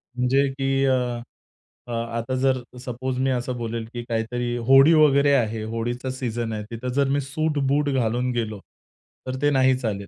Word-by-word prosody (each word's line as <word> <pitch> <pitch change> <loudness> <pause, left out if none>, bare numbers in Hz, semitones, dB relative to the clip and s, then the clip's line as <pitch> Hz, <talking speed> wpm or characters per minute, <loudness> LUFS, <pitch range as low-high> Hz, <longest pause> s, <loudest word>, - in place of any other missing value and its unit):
म्हणजे 130 +3 +2
की 135 0 +1
अ, 125 -2 0 0.7
आता 115 +2 -3
जर 130 0 +2 0.3
सपोज 125 +1 -3
मी 135 +1 +1
असं 125 0 -2
बोलेल 115 -1 -4
की 120 -1 -5
काहीतरी 120 +1 -2
होळी 135 +4 +7
वगैरे 145 -2 +5
आहे, 110 -4 +1
होळीचा 115 +3 -3
सीझन 120 -3 -3
आहे 105 - -4
तिथं 115 +2 -5
जर 140 -1 +3
मी 140 +1 +1
सूट-बूट 145 0 0
घालून 125 -1 0
गेलो 110 -4 -3 0.7
तर 130 - -2
ते 145 - +4
नाही 130 -1 +4
चालेल. 105 -5 -3
125 Hz, 160 wpm, -24 LUFS, 115-135 Hz, 0.7 s, होळी